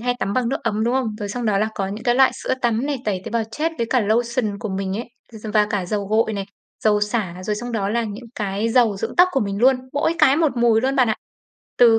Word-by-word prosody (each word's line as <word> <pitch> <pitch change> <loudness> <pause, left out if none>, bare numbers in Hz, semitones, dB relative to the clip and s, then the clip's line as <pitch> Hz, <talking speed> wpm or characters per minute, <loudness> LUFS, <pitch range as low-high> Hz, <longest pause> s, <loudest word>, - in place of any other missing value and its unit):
hay 245 +1 0
tắm 200 - -2
bằng 245 +1 0
nước 270 - 0
ấm, 215 +1 0
đúng 240 +2 +1
không? 245 -5 -1
Rồi 205 -2 -4
xong 240 +4 -4
đó 205 -2 +2
là 215 +2 +1
có 195 - -2
những 210 +3 -7
cái 240 -1 +3
loại 265 0 +5
sữa - - -2
tắm 235 +2 +1
này, 290 -1 -1
tẩy 195 -3 -1
tế - - -6
bào 230 -1 0
chết 315 +7 -1
với 235 - 0
cả 255 - +3
lotion 225 0 0
của 215 - -4
mình 190 0 -2
ấy, 235 - -4 0.3
dầ 220 -1 -7
và 210 -1 +4
cả 205 -4 -1
dầu 200 +1 -2
gội 220 +2 +1
này, 200 -2 -3 0.4
dầu 210 -1 +4
xả, 205 -4 -2
rồi 210 +3 -1
xong 240 +3 -5
đó 200 -3 -1
là 230 +2 0
những 215 +3 -7
cái 210 -2 -2
dầu 230 -3 +3
dưỡng - - -4
tóc 360 +1 +7
của 270 - +1
mình 200 -1 -2
luôn, 260 +3 +5 0.2
mỗi 290 +3 +1
cái 290 -4 +5
một 315 -5 +1
mùi 235 -2 +4
luôn 265 +3 0
bạn 255 -3 +4
ạ. 220 - 0 0.6
Từ 230 -2 +6
225 Hz, 280 wpm, -21 LUFS, 205-245 Hz, 0.6 s, tóc